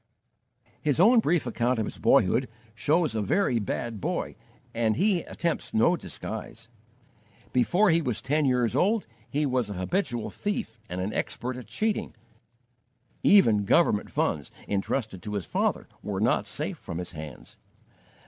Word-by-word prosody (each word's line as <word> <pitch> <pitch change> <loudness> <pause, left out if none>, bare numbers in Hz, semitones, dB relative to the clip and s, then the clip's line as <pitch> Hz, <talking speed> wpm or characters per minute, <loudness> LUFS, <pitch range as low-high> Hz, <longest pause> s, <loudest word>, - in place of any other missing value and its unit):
His 150 +1 0
own 230 +6 +7
brief 175 - +1
account 120 +1 0
of 110 - 0
his - - -7
boyhood 125 +8 +3 0.2
shows 155 +6 +1
a 110 - -1
very 120 - +1
bad 110 +1 -3
boy - - -2 0.4
and 115 -2 +1
he 190 -1 +2
attempts 170 0 -3
no 140 +11 +4
disguise. 115 -6 -7 0.9
Before 175 - +4
he 165 +1 +3
was 125 -8 -2
ten 145 +3 +1
years 125 -4 +2
old 210 +3 +2 0.2
he 150 +1 0
was 125 -5 0
a - - -3
habitual 120 - -2
thief 125 - -3
and 90 +1 -3
an 100 +3 -2
expert 125 +1 -3
at 125 -2 -9
cheating; 220 -1 -2 1.1
even 115 - +5
government 100 - +3
funds, 75 -2 -1 0.2
entrusted 100 0 -2
to 105 0 -5
his 100 -5 -2
father, - - -1
were - - -3
not - - +2
safe - - -3
from 85 - -6
his 90 0 -5
hands. 75 -4 -10
125 Hz, 150 wpm, -27 LUFS, 105-170 Hz, 1.1 s, own